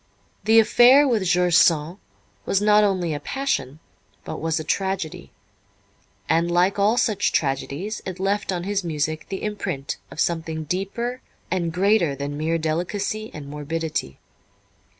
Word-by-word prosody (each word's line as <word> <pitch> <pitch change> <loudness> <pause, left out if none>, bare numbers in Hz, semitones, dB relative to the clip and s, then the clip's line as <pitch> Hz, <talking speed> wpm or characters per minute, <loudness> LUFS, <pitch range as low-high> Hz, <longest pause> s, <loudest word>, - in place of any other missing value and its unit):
The 220 +1 +5
affair 245 +6 +6
with 225 -7 +1
George 180 0 +2
Sand 165 +1 +4 0.5
was 195 - +1
not 210 0 +5
only 185 -5 0
a 145 - -3
passion, 150 - -2 0.5
but - - -6
was 160 +1 0
a - - -4
tragedy, 165 - -3 1.0
and 170 +1 +2
like 180 +3 +2
all 210 +4 +3
such 215 -4 +1
tragedies 145 +8 -2
it 185 -1 -6
left 200 +1 0
on 175 -2 -3
his 200 0 -1
music 155 -1 -2
the 195 - -5
imprint 145 -10 -3
of - - -11
something 160 -2 -1
deeper 200 - -3 0.3
and 175 -2 0
greater 180 -4 +2
than 140 +1 -4
mere 160 +3 0
delicacy 180 +7 -2
and 145 -2 -9
morbidity. 150 - -4
175 Hz, 145 wpm, -23 LUFS, 155-205 Hz, 1.0 s, affair